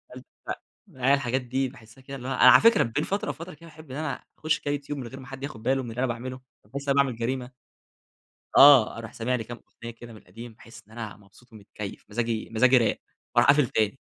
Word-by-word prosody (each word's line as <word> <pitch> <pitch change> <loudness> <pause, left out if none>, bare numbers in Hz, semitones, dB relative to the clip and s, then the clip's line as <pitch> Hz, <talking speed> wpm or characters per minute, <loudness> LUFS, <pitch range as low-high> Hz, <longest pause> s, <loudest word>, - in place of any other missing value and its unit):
ت - - -10 0.7
آه، 130 - -3
هي 135 - +5
الحاجات 130 -2 0
دي 130 +2 -1
باحسها 120 -1 -17
كده 135 +1 -9
اللي 125 -1 -8
هو - - -3
أنا - - +7
على - - +8
فكرة 230 -1 +5
بين 120 +6 -2
فترة 200 0 -2
وفترة 165 +6 -7
كده 165 +2 -15
باحب 155 -3 -14
إن 130 - -5
أنا 155 -2 -4 0.2
أخش 155 +1 0
كده 145 - -2
يوتيوب 145 0 -5
من 125 - -6
غير 130 +3 -10
ما 130 - -12
حد 135 +1 -9
ياخد 140 -6 -7
باله 130 +2 +1
من 120 - -7
اللي 115 +2 -7
أنا 130 - +1
باعمله، 130 +2 -5 0.3
حاسس 140 +1 -5
إن - - +4
أنا - - +2
باعمل 130 -4 -4
جريمة 125 +2 -3 1.1
آه، 135 -6 +8
أروح 110 -2 -8
سامع 120 +2 -2
لي 115 -3 -2
كده 120 - -7
كام - - -16 0.3
أغنية 115 0 -12
من - - -12
القديم 115 +5 -11
باحس 115 0 -14
إن 110 - -20
أنا 110 -2 -7
مبسوط 105 +4 -22
ومتكيف 105 -1 -9
مزاجي 115 0 -2
مزاجي 125 +3 +5
راق، 115 - +1 0.4
وأروح 120 +1 +4
قافل 145 -1 +4
تاني 110 +4 0
125 Hz, 240 wpm, -26 LUFS, 115-140 Hz, 1.1 s, على